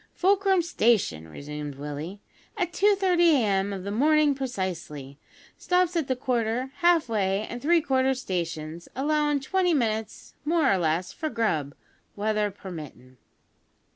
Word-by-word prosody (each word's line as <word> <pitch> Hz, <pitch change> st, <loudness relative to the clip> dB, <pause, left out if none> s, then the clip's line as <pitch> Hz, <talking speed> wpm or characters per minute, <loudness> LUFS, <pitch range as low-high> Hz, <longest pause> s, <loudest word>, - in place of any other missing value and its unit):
"Fulcrum 385 Hz, -1 st, +3 dB
Station," 215 Hz, -, +1 dB
resumed 145 Hz, -, -7 dB
Willie, 150 Hz, +7 st, -6 dB, 0.4 s
"at 355 Hz, -3 st, -1 dB
2:30 385 Hz, -3 st, +3 dB, 0.2 s
a.m. 200 Hz, -5 st, +1 dB
of 195 Hz, -2 st, -5 dB
the 200 Hz, -, -4 dB
mornin' 300 Hz, +5 st, +3 dB
precisely. 175 Hz, -, -5 dB, 0.4 s
Stops 360 Hz, 0 st, +1 dB
at 320 Hz, -5 st, 0 dB
the 260 Hz, -, 0 dB
Quarter, 245 Hz, 0 st, -1 dB
Half 345 Hz, -5 st, +3 dB
way, 200 Hz, -2 st, 0 dB
an' 240 Hz, -, -6 dB
Three 330 Hz, +5 st, +3 dB
quarter 265 Hz, -2 st, +1 dB
Stations, 170 Hz, -7 st, -4 dB
allowin' 295 Hz, +1 st, +1 dB
twenty 360 Hz, +3 st, +1 dB
minutes, 220 Hz, -4 st, -2 dB
more 310 Hz, -2 st, +2 dB
or -, -, +2 dB
less, 165 Hz, +2 st, 0 dB
for 315 Hz, -2 st, -3 dB
grub 160 Hz, -, -1 dB, 0.4 s
weather 210 Hz, 0 st, 0 dB
permittin'." 155 Hz, -10 st, -10 dB
230 Hz, 135 wpm, -26 LUFS, -, 0.4 s, Fulcrum